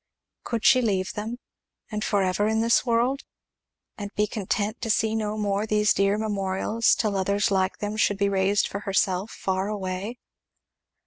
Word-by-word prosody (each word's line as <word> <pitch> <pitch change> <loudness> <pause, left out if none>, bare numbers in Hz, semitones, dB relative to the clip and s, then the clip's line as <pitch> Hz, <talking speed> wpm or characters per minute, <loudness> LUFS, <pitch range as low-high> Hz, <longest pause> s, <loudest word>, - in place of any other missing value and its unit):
Could 230 -2 -3
she 255 - +6
leave 195 -5 0
them? 220 +3 -4 0.5
and 215 0 -3
for 200 -2 +1
ever 190 +3 +1
in 220 0 +1
this 230 +1 +3
world? 240 +4 +1 0.8
and 205 -1 -4
be 210 - +2
content 210 +1 -2
to 230 - -3
see 220 0 +2
no 215 -1 -2
more 205 0 -1
these 210 -1 +3
dear 195 +1 +2
memorials 210 +1 +1
till 210 -3 -1
others 200 +2 +1
like 190 0 +1
them 210 +1 -4
should 205 -2 +2
be 200 0 +2
raised 195 +1 +2
for 200 - -5
herself, 195 0 0
far 190 -1 -2
away? 200 +2 -4
205 Hz, 170 wpm, -25 LUFS, 195-220 Hz, 0.8 s, she